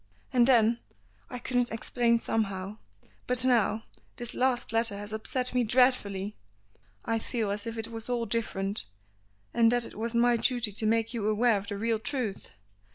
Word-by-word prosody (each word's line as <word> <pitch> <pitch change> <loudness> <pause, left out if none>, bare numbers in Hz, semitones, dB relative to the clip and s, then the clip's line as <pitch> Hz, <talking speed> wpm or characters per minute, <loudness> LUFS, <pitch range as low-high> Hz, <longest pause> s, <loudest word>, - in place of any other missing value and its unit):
And 245 -1 +5
then, 235 -2 +4 0.5
I 250 - -5
couldn't 245 0 0
explain 235 +1 +1
somehow 200 -3 -2 0.5
but 250 0 +1
now 225 -3 +2 0.3
this 240 -1 -3
last 250 -3 0
letter 225 -2 +1
has 205 +1 -7
upset 250 +3 0
me 250 -1 +2
dreadfully; 215 -5 +1 0.7
I 225 0 0
feel 220 -2 -2
as 205 +3 -4
if 230 0 -5
it 225 0 -3
was 225 +1 -6
all 240 -2 0
different, 205 - 0 0.7
and 230 -1 +4
that 245 -1 +2
it - - -10
was 230 +2 -2
my 240 0 +4
duty 240 -2 +1
to 215 +2 +1
make 225 +1 +1
you 220 -3 -2
aware 220 +2 +3
of 200 - -11
the 200 - -4
real 225 +1 0
truth. 240 -4 -3
230 Hz, 170 wpm, -29 LUFS, 215-245 Hz, 0.7 s, And